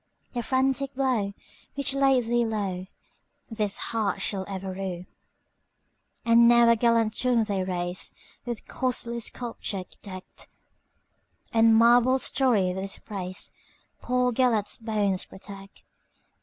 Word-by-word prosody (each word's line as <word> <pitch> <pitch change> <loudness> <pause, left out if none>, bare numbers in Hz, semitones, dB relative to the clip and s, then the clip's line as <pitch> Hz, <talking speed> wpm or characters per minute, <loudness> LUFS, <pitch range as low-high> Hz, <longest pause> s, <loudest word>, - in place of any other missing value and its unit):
The 240 - -2
frantic 265 +2 0
blow 250 -7 0 0.4
which 280 -1 -1
laid 270 -2 +3
thee 240 +1 +1 1.1
lowThis 210 -2 -1
heart 210 -4 -1
shall 190 0 -2
ever 190 -1 -5
rue."And 195 +5 -2
now 235 0 +6
a 235 - +6
gallant 230 -1 +2
tomb 245 -3 +2
they 200 -3 -1
raise, 180 -1 -3 0.3
With 240 -2 -5
costly 235 -2 -1
sculpture 225 -4 -4 0.2
decked; 185 -2 -9 1.1
And 225 0 +5
marbles 245 +3 +5
storied 210 -8 +2
with 190 - -3
his 195 - -4
praisePoor 220 +5 -3
Gêlert's 230 -4 +1
bones 210 -4 -1
protect. 195 0 -12
225 Hz, 110 wpm, -26 LUFS, 195-245 Hz, 1.1 s, now